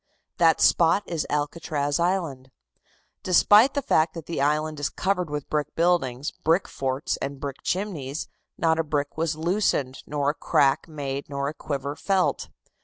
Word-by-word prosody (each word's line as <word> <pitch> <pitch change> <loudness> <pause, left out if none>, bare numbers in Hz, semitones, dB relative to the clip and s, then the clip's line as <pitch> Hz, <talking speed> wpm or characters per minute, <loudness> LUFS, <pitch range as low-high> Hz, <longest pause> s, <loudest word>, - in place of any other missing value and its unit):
That 165 -2 +5
spot 170 +4 +4
is 165 -4 -3
Alcatraz 145 -1 -1
Island. 170 -8 -1 0.7
Despite 205 +8 +5
the 285 - 0
fact 160 -7 +2
that 165 -2 -7
the 165 -5 -3
island 150 +1 0
is 145 - -1
covered 180 -4 -1
with 150 -1 -4
brick 150 -1 -2
buildings, 150 -6 +1
brick 165 +4 +1
forts 135 +1 -2
and 140 0 -5
brick 140 -1 -5
chimneys, 160 -8 -3 0.3
not 160 -1 +2
a - - +2
brick 145 -2 -2
was 160 -1 -1
loosened 160 -6 0
nor 145 -1 0
a - - -11
crack 140 -2 +2
made 140 -3 -5
nor 140 0 -2
a - - -6
quiver 140 -2 -4
felt. 190 +2 0
155 Hz, 160 wpm, -25 LUFS, 140-170 Hz, 0.7 s, That